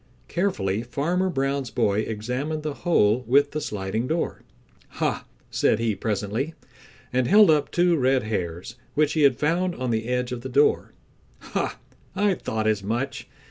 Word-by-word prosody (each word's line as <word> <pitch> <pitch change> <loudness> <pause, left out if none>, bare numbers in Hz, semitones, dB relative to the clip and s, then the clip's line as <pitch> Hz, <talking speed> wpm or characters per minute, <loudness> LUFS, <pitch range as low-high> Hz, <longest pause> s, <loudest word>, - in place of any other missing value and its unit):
Carefully 110 - -1
Farmer 170 +10 -1
Brown's 135 -4 -1
boy 105 -1 +1
examined 125 +9 -3
the 155 -1 -2
hole 125 - +2
with 140 +3 +4
the 155 - -3
sliding 105 +2 -3
door. 160 +3 -2 0.6
"Ha!" - - -1 0.3
said - - +2
he 115 -1 0
presently, 110 - -2 0.6
and 125 -1 +2
held 205 -2 +7
up 150 -2 +2
two 175 0 +3
red 130 -3 +2
hairs 95 0 -4 0.2
which 150 0 +2
he 155 - +1
had 140 -4 +5
found 175 +5 0
on 130 -1 -2
the 110 0 -1
edge 125 0 -1
of 125 -1 -4
the 130 - -6
door. 140 +4 +2 0.4
"Ha! - - -3 0.4
I 200 0 +2
thought 110 -10 -3
as 110 -2 +1
much. 125 +7 -3
130 Hz, 160 wpm, -25 LUFS, 110-155 Hz, 0.6 s, held